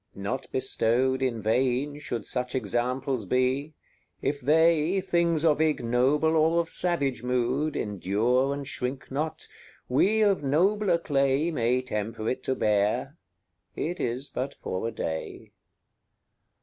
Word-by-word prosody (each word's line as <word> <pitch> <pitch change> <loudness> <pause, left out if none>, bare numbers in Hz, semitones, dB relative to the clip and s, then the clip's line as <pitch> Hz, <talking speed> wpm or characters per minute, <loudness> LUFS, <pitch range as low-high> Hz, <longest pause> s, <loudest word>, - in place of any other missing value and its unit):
Not 100 +7 -4
bestowed 130 0 +1
In 120 -5 -1
vain 130 +5 0
should 120 -6 -4
such 125 0 -3
examples 125 0 -1
be; 130 +6 0 0.4
if 145 0 -2
they, 160 +5 +3
Things 170 -3 +1
of 155 -1 +3
ignoble 150 +2 +2
or 160 +2 +3
of 165 -1 -2
savage 140 -9 0
mood, 125 +4 0
Endure 110 +7 0
and 140 -1 -4
shrink 130 -1 -4
not, 150 +3 -3 0.4
we 200 +12 +3
of 200 -7 +3
nobler 180 +6 +2
clay 140 0 +1
May 125 -2 +1
temper 110 -1 -4
it 130 0 -2
to 130 - 0
bear, 105 +7 +1 0.6
it 175 +3 -3
is 125 +4 -2
but 135 +3 -4
for 95 +5 -4
a - - -3
day. 80 -7 -5
130 Hz, 130 wpm, -27 LUFS, 125-155 Hz, 0.6 s, they